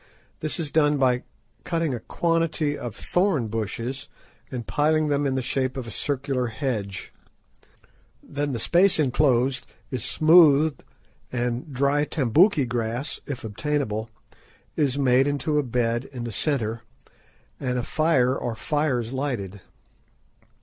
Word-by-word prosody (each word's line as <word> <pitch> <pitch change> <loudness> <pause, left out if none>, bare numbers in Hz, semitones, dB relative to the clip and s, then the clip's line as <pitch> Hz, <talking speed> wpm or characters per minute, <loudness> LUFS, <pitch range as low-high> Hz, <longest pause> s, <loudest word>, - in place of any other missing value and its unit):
This 155 +3 -3
is 155 -3 -3
done 150 -2 +3
by 125 -2 +2 0.4
cutting 165 -4 -1
a 120 - -3
quantity 165 +1 0
of 120 -6 -6
thorn 175 - 0
bushes 115 +4 -4 0.4
and 125 -3 -5
piling 155 +1 +2
them 145 0 +1
in 135 - 0
the 130 - -1
shape 130 +1 -1
of 130 - -4
a 115 - -8
circular 135 -2 -1
hedge. 110 -6 -4 1.1
Then 145 0 -3
the 125 - -2
space 175 - +4
enclosed 130 -3 +2 0.2
is 125 -4 -3
smoothed, 155 0 +5 0.5
and 125 +3 -2
dry 140 +3 +2
tambouki 150 - +3
grass, 120 +3 -3
if 140 -4 -5
obtainable, 110 -1 -2 0.7
is 140 -3 +1
made 135 0 +4
into 145 +1 0
a - - +1
bed 120 0 0
in 125 -3 -7
the 120 - -4
centre, 115 -3 -1 0.8
and 125 -2 -1
a 125 - -1
fire 155 -6 +2
or 120 -3 -3
fires 130 -3 -1
lighted. 115 -9 -3
135 Hz, 135 wpm, -25 LUFS, 120-150 Hz, 1.1 s, smoothed